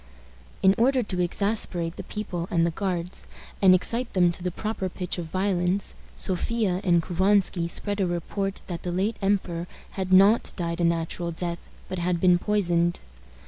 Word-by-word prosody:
In 190 Hz, 0 st, +6 dB
order 255 Hz, +1 st, +3 dB
to 185 Hz, -4 st, -2 dB
exasperate 175 Hz, -2 st, 0 dB
the -, -, -6 dB
people 180 Hz, -5 st, -5 dB
and 170 Hz, -5 st, +2 dB
the 170 Hz, -, 0 dB
Guards, 180 Hz, 0 st, -4 dB, 0.3 s
and 185 Hz, -2 st, +7 dB
excite 230 Hz, +7 st, +1 dB
them 180 Hz, -2 st, +4 dB
to 175 Hz, -, -7 dB
the 180 Hz, -, -1 dB
proper 205 Hz, +1 st, -4 dB
pitch 180 Hz, 0 st, -4 dB
of 170 Hz, -, -5 dB
violence, 185 Hz, +1 st, +1 dB, 0.2 s
Sophia 190 Hz, 0 st, +1 dB
and 175 Hz, -3 st, +3 dB
Couvansky 190 Hz, -1 st, +2 dB
spread 205 Hz, +3 st, 0 dB
a 185 Hz, -, +1 dB
report 195 Hz, +3 st, -3 dB
that 175 Hz, -2 st, -6 dB
the 180 Hz, -, -4 dB
late 195 Hz, +5 st, -1 dB
emperor 185 Hz, -4 st, -1 dB, 0.2 s
had 190 Hz, -1 st, -4 dB
not 195 Hz, +5 st, +5 dB
died 170 Hz, -1 st, -3 dB
a -, -, +2 dB
natural 170 Hz, +1 st, -1 dB
death, 170 Hz, +1 st, -4 dB, 0.3 s
but 185 Hz, -, -5 dB
had 175 Hz, 0 st, 0 dB
been 180 Hz, -1 st, +4 dB
poisoned. 175 Hz, -4 st, +1 dB
180 Hz, 170 wpm, -25 LUFS, 175-200 Hz, 0.3 s, and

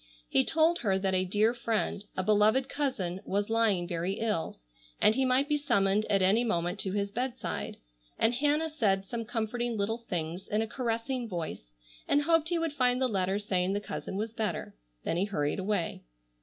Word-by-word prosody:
He 135 Hz, -, +3 dB
told 325 Hz, +2 st, +3 dB
her 195 Hz, -5 st, +1 dB
that 190 Hz, 0 st, 0 dB
a 185 Hz, 0 st, +2 dB
dear 210 Hz, +5 st, +2 dB
friend, 225 Hz, -4 st, -1 dB
a 185 Hz, -, +1 dB
beloved 215 Hz, +6 st, +4 dB
cousin, 195 Hz, -13 st, -2 dB
was 200 Hz, +2 st, -1 dB
lying 215 Hz, -6 st, +2 dB
very 175 Hz, +2 st, -1 dB
ill, 210 Hz, -, -2 dB, 0.4 s
and 215 Hz, -, +5 dB
he 265 Hz, +3 st, +1 dB
might 260 Hz, +2 st, +3 dB
be 295 Hz, 0 st, +2 dB
summoned 205 Hz, -7 st, +2 dB
at 195 Hz, -2 st, +3 dB
any 205 Hz, +6 st, +4 dB
moment 180 Hz, -3 st, -1 dB
to 190 Hz, -1 st, -2 dB
his 200 Hz, 0 st, -1 dB
bedside, 250 Hz, +3 st, -3 dB, 0.4 s
and 225 Hz, +2 st, +3 dB
Hannah 295 Hz, +5 st, +1 dB
said 195 Hz, -10 st, +1 dB
some 230 Hz, +3 st, -4 dB
comforting 235 Hz, +1 st, -2 dB
little 215 Hz, +3 st, -1 dB
things 175 Hz, -5 st, -4 dB
in 215 Hz, +1 st, +1 dB
a -, -, -4 dB
caressing 235 Hz, +1 st, -2 dB
voice, 160 Hz, -, -5 dB, 0.3 s
and 290 Hz, +1 st, +3 dB
hoped 325 Hz, 0 st, +3 dB
he 345 Hz, -, +1 dB
would 330 Hz, -2 st, -1 dB
find 250 Hz, -3 st, +2 dB
the 260 Hz, -, +3 dB
letter 190 Hz, -3 st, 0 dB
saying 190 Hz, -2 st, 0 dB
the 205 Hz, -, 0 dB
cousin 200 Hz, -, -6 dB
was 220 Hz, +3 st, -3 dB
better. 220 Hz, -2 st, -3 dB, 0.3 s
Then 165 Hz, -, -1 dB
he 185 Hz, -, +2 dB
hurried 150 Hz, -5 st, -1 dB
away. 190 Hz, -3 st, -1 dB
215 Hz, 190 wpm, -30 LUFS, 190-245 Hz, 0.4 s, and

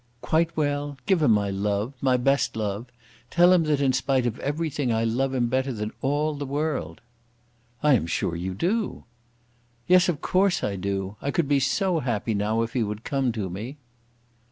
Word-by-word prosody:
"Quite 165 Hz, +1 st, +1 dB
well? 145 Hz, -1 st, -1 dB
Give 190 Hz, -5 st, +2 dB
him 150 Hz, -, +4 dB
my 105 Hz, -2 st, +3 dB
love, 100 Hz, +5 st, -1 dB
my 130 Hz, -2 st, +3 dB
best 135 Hz, -1 st, +1 dB
love. 105 Hz, +2 st, -3 dB, 0.4 s
Tell 175 Hz, +1 st, +5 dB
him 170 Hz, -3 st, +3 dB
that 150 Hz, -2 st, +1 dB
in 135 Hz, -2 st, +2 dB
spite 130 Hz, 0 st, +1 dB
of 120 Hz, 0 st, -2 dB
everything 145 Hz, -3 st, -1 dB
I 115 Hz, 0 st, +1 dB
love 125 Hz, +4 st, 0 dB
him 125 Hz, -2 st, +2 dB
better 130 Hz, +3 st, 0 dB
than 105 Hz, -2 st, -4 dB
all 145 Hz, +3 st, 0 dB
the 145 Hz, -1 st, -5 dB
world." 150 Hz, +2 st, -2 dB, 0.8 s
"I 150 Hz, -1 st, +5 dB
am 100 Hz, -10 st, +2 dB
sure 85 Hz, -, -1 dB
you 90 Hz, +2 st, -4 dB
do." 205 Hz, -, -1 dB, 0.8 s
"Yes; 180 Hz, 0 st, +5 dB
of 160 Hz, -5 st, -1 dB
course 190 Hz, 0 st, +1 dB
I 100 Hz, -, -1 dB
do. 95 Hz, +1 st, -3 dB
I 140 Hz, -, -2 dB
could 155 Hz, 0 st, 0 dB
be 140 Hz, -1 st, +3 dB
so 175 Hz, +6 st, +1 dB
happy 115 Hz, -4 st, -1 dB
now 105 Hz, +3 st, 0 dB
if 115 Hz, -, -5 dB
he 125 Hz, -, 0 dB
would 105 Hz, 0 st, -3 dB
come 135 Hz, -3 st, 0 dB
to 105 Hz, -4 st, -3 dB
me." 110 Hz, +11 st, -6 dB
130 Hz, 190 wpm, -25 LUFS, 110-150 Hz, 0.8 s, Tell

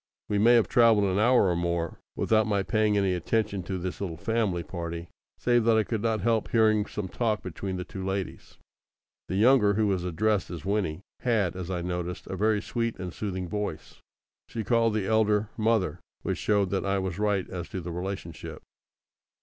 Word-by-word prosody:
We 105 Hz, -, +1 dB
may 120 Hz, +3 st, +6 dB
have 115 Hz, -, +4 dB
travelled 115 Hz, -4 st, +5 dB
an 95 Hz, 0 st, +1 dB
hour 120 Hz, +1 st, +5 dB
or 90 Hz, -, +1 dB
more 85 Hz, -1 st, -2 dB, 0.2 s
without 110 Hz, -1 st, +2 dB
my 100 Hz, -2 st, +1 dB
paying 105 Hz, +3 st, +2 dB
any 100 Hz, -2 st, +2 dB
attention 100 Hz, +3 st, -1 dB
to 95 Hz, 0 st, -3 dB
this 90 Hz, +2 st, -5 dB
little 85 Hz, -5 st, -3 dB
family 105 Hz, -3 st, 0 dB
party, 85 Hz, -1 st, -6 dB, 0.3 s
save 120 Hz, -1 st, +2 dB
that 115 Hz, -1 st, +5 dB
I 110 Hz, -, +4 dB
could 110 Hz, -1 st, -3 dB
not 110 Hz, -2 st, 0 dB
help 115 Hz, +1 st, +1 dB
hearing 110 Hz, -2 st, +3 dB
some 105 Hz, -2 st, -4 dB
talk 110 Hz, +1 st, -1 dB
between 95 Hz, +1 st, -4 dB
the 90 Hz, -, -3 dB
two 95 Hz, +1 st, -7 dB
ladies. 95 Hz, -1 st, -4 dB, 0.7 s
The 95 Hz, -, -3 dB
younger, 105 Hz, -1 st, +5 dB
who 110 Hz, +1 st, +2 dB
was 95 Hz, -3 st, 0 dB
addressed 100 Hz, +4 st, 0 dB
as 85 Hz, -4 st, -7 dB
Winnie, 95 Hz, -5 st, -1 dB, 0.2 s
had, 110 Hz, -8 st, +1 dB
as 90 Hz, -1 st, -5 dB
I 90 Hz, -2 st, -2 dB
noticed, 90 Hz, 0 st, -4 dB
a -, -, -5 dB
very 105 Hz, +2 st, +1 dB
sweet 115 Hz, -1 st, -2 dB
and 90 Hz, -2 st, -6 dB
soothing 95 Hz, -3 st, -4 dB
voice. 100 Hz, -4 st, -5 dB, 0.5 s
She 115 Hz, -, -4 dB
called 115 Hz, 0 st, +2 dB
the 105 Hz, -3 st, 0 dB
elder 105 Hz, -1 st, +2 dB
"mother," 110 Hz, -5 st, +1 dB, 0.2 s
which -, -, -2 dB
showed 100 Hz, -3 st, +1 dB
that 95 Hz, -, 0 dB
I 100 Hz, 0 st, 0 dB
was 95 Hz, -1 st, -3 dB
right 105 Hz, -3 st, +1 dB
as 90 Hz, -2 st, -5 dB
to 95 Hz, -, -4 dB
the 85 Hz, 0 st, -6 dB
relationship. 90 Hz, -1 st, -6 dB
100 Hz, 195 wpm, -27 LUFS, 90-110 Hz, 0.7 s, may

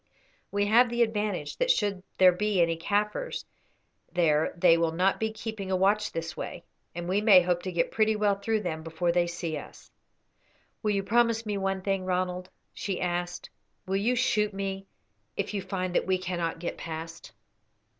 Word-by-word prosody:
We 205 Hz, 0 st, +1 dB
have 235 Hz, +4 st, +5 dB
the 240 Hz, 0 st, +3 dB
advantage 210 Hz, -9 st, -2 dB
that -, -, 0 dB
should 205 Hz, -, +1 dB, 0.2 s
there 185 Hz, -1 st, +7 dB
be 205 Hz, +1 st, 0 dB
any 165 Hz, -1 st, +3 dB
Kaffirs 210 Hz, -, -1 dB, 0.7 s
there 160 Hz, -4 st, +2 dB
they 170 Hz, -1 st, +6 dB
will 165 Hz, -1 st, +1 dB
not 185 Hz, +3 st, +2 dB
be 220 Hz, 0 st, 0 dB
keeping 220 Hz, -3 st, -6 dB
a 190 Hz, -, +1 dB
watch 205 Hz, +3 st, +2 dB
this 165 Hz, +1 st, -4 dB
way, 170 Hz, -, -6 dB, 0.3 s
and 175 Hz, 0 st, -4 dB
we 195 Hz, +3 st, +1 dB
may 200 Hz, -4 st, +7 dB
hope 175 Hz, 0 st, 0 dB
to 185 Hz, -, -4 dB
get 170 Hz, -1 st, 0 dB
pretty 220 Hz, 0 st, +2 dB
well 210 Hz, -1 st, +2 dB
through 215 Hz, +2 st, -1 dB
them 160 Hz, -5 st, -3 dB
before 165 Hz, +2 st, -1 dB
they 175 Hz, 0 st, +2 dB
see 170 Hz, -2 st, -3 dB
us." -, -, -13 dB, 0.9 s
"Will 215 Hz, -, 0 dB
you 200 Hz, -1 st, +1 dB
promise 230 Hz, +1 st, +2 dB
me 210 Hz, -1 st, -2 dB
one 195 Hz, 0 st, -1 dB
thing, 195 Hz, -1 st, 0 dB
Ronald?" 180 Hz, 0 st, -2 dB, 0.2 s
she 195 Hz, -3 st, -3 dB
asked. 175 Hz, 0 st, -3 dB, 0.3 s
"Will 190 Hz, -, -1 dB
you 220 Hz, +6 st, +2 dB
shoot 210 Hz, -3 st, +1 dB
me 195 Hz, 0 st, -4 dB, 0.5 s
if -, -, -2 dB
you 200 Hz, -, -1 dB
find 185 Hz, -1 st, -3 dB
that -, -, +1 dB
we 190 Hz, 0 st, +2 dB
cannot 175 Hz, -3 st, -3 dB
get 170 Hz, +1 st, -5 dB
past?" 165 Hz, 0 st, -7 dB
190 Hz, 185 wpm, -28 LUFS, 175-210 Hz, 0.9 s, there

